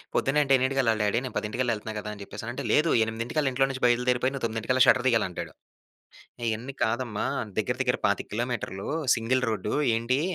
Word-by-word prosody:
పొద్దున్న 150 +2 +2
అంటే 135 -1 +2
ఎన్నింటికెళ్ళాలి 130 -4 +1
డ్యాడీ 105 +3 +2
నేను 125 - -7
పదింటికల్లా 115 +3 -1
యెళ్తన్నా 110 +1 -7
కదా 105 - -6
అని 105 - -11
చెప్పేసనంటే, 120 +6 -6
"లేదు, 155 +2 +3
ఎనిమిదింటికల్లా 120 +6 -1
ఇంట్లో 135 +1 +2
నుంచి 130 - -7
బయలుదేరిపోయి, 125 +2 +2
నువ్వు 135 -3 -3
తొమ్మిదింటికల్లా 115 +3 +2
షట్టర్ 130 0 +4
దియ్యాలి" 115 -4 +3
అంటాడు. 85 -3 -7 1.0
ఇయన్నీ 120 +5 -4
కాదమ్మా! 115 -1 -1 0.3
దెగ్గిర 125 +4 -1
దెగ్గిర 125 -1 0
25 100 - -1
కిలోమీటర్లూ, 115 -4 -3 0.3
సింగిల్ 125 +3 0
రోడ్డూ 105 0 -2 0.2
ఏంటీ, 120 +4 0
120 Hz, 170 wpm, -27 LUFS, 110-130 Hz, 1.0 s, షట్టర్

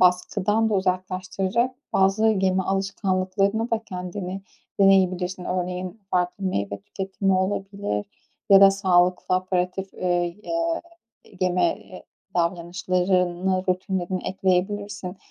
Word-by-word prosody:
baskıdan 200 +4 +2
da - - +1
uzaklaştıracak 185 +5 -1 0.2
bazı 195 +3 +3
yeme 190 -3 +2
alışkanlıklarını 195 +2 0
da 225 - +2
kendine 185 0 -5 0.4
deneyebilirsin. 185 -2 +3
Örneğin, 180 +3 -3
farklı 180 +2 0
meyve 100 - -2
tüketimi 195 - -2
olabilir 195 - -2 0.4
ya 195 -1 +9
da 195 0 +9
sağlıklı, 185 -2 +2
aperitif, 185 +1 -1
ııı, - - -10 0.4
ya 335 +4 -1 0.6
yeme, 180 -1 +2
eee, 185 - -13 0.3
davranışlarını 180 +1 0
rutinlerini 185 0 -1
ekleyebilirsin 195 +1 -1
185 Hz, 100 wpm, -24 LUFS, 180-195 Hz, 0.6 s, ya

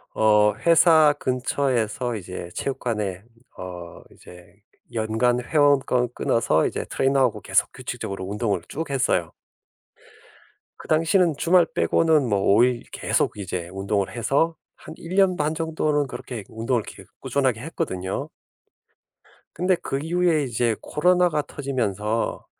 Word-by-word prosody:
어 105 -1 +4
회사 160 -2 +6
근처에서 125 -2 -1
이제 90 -3 -7
체육관에 105 -8 -3 0.4
어 90 -2 -8
이제 90 +1 -16 0.4
연간 115 +2 +1
회원권 135 -4 +2
끊어서 80 -9 +1
이제 - - -4
트레이너하고 135 -5 +1
계속 - - +1
규칙적으로 95 -1 -6
운동을 100 -1 -1
쭉 160 +1 -5
했어요. 125 - 0 1.5
그 - - -12
당시는 165 +1 +2
주말 175 +2 +4
빼고는 150 - +2
뭐 100 -2 +2
5 110 +4 +5
일 125 -1 +1
계속 - - -1
이제 90 -3 -5
운동을 100 +1 -2
해서 140 +8 +1 0.2
한 155 - -11
1 170 +2 -7
년 190 -2 +3
반 150 +1 -1
정도는 155 -3 0
그렇게 120 -3 -7
운동을 115 +1 -1
계속 - - -12
꾸준하게 130 -5 0
했거든요. 95 - -4 1.3
근데 180 +1 +2
그 135 -5 -4
이후에 165 -1 +1
이제 120 -3 0
코로나가 180 0 +2
터지면서 115 -7 -2
125 Hz, 275 characters per minute, -23 LUFS, 105-155 Hz, 1.5 s, 회사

